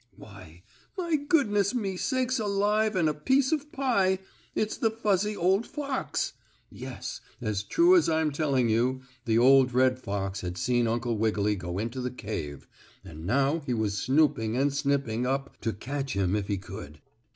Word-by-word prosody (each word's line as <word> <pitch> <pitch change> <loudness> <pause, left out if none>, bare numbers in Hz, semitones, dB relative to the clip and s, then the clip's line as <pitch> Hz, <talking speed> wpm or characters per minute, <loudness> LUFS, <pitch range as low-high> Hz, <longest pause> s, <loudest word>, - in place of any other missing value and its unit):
Why, 90 -5 -14 0.3
my 340 -3 0
goodness 255 - +2
me 200 -6 -1
sakes 255 +4 0
alive 210 +1 +1
and 170 -4 +2
a 155 - +1
piece 260 - +2
of 300 -1 -1
pie! 200 -9 +2 0.4
It's 215 0 0
the 225 - +1
fuzzy 210 -2 0
old 190 +6 +2
fox! 280 -2 -3 0.4
Yes, - - -7 0.2
as 110 -5 -2
true 340 - +4
as 350 - +4
I'm 160 -1 +1
telling 140 -4 +1
you, 125 +4 +1 0.2
the 115 -1 +2
old 130 0 +5
red 130 0 +3
fox 100 -3 -3
had 90 0 -5
seen 120 +6 +1
Uncle 115 -1 -1
Wiggily 105 -1 +1
go 90 -1 -5
into 115 +5 -3
the 125 - -2
cave, 95 - -6 0.4
and 80 -2 -9
now 140 +7 +2
he 140 -5 -3
was 105 -3 -1
snooping 130 -5 +2
and 140 +1 +2
snipping 135 -4 0
up 135 +1 -3
to 115 - 0
catch 135 +5 -4
him 95 0 +1
if 100 -2 -2
he 100 -1 -1
could. 90 -5 -9
135 Hz, 170 wpm, -28 LUFS, -, 0.4 s, old